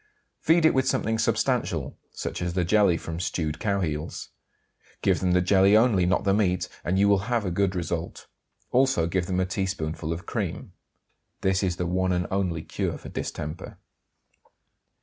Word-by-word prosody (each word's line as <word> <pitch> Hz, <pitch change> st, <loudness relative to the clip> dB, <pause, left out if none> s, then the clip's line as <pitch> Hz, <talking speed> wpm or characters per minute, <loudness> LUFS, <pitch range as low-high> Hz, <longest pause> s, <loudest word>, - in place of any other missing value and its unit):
Feed 165 Hz, 0 st, +3 dB
it 160 Hz, -, +5 dB
with 130 Hz, 0 st, +1 dB
something 110 Hz, -3 st, 0 dB
substantial, -, -, 0 dB, 0.2 s
such -, -, -5 dB
as 90 Hz, -1 st, -2 dB
the 90 Hz, -1 st, 0 dB
jelly 100 Hz, -2 st, +4 dB
from 85 Hz, 0 st, -6 dB
stewed 80 Hz, -3 st, -2 dB
cowheels; 85 Hz, -7 st, -2 dB, 0.7 s
give -, -, +3 dB
them 90 Hz, -1 st, +1 dB
the 90 Hz, -, +4 dB
jelly 100 Hz, +2 st, +5 dB
only, 110 Hz, -6 st, +3 dB
not 90 Hz, -, +1 dB
the 100 Hz, -, +2 dB
meat; 90 Hz, -3 st, +1 dB, 0.2 s
and 95 Hz, +2 st, 0 dB
you 100 Hz, +1 st, +4 dB
will 100 Hz, -1 st, +4 dB
have 120 Hz, -4 st, +1 dB
a 90 Hz, -, -1 dB
good 95 Hz, +1 st, 0 dB
result. 85 Hz, -1 st, -4 dB, 0.5 s
Also 130 Hz, -10 st, +3 dB
give 85 Hz, +1 st, -1 dB
them 95 Hz, -1 st, -1 dB
a 95 Hz, -, +2 dB
teaspoonful 85 Hz, -4 st, -3 dB
of 85 Hz, +1 st, -5 dB
cream. -, -, -4 dB, 0.7 s
This 95 Hz, 0 st, +1 dB
is 90 Hz, -3 st, 0 dB
the 90 Hz, -, -2 dB
one 95 Hz, +2 st, 0 dB
and 90 Hz, 0 st, 0 dB
only 90 Hz, -4 st, -1 dB
cure -, -, -3 dB
for -, -, -10 dB
distemper. 75 Hz, +3 st, -6 dB
90 Hz, 170 wpm, -26 LUFS, 85-100 Hz, 0.7 s, it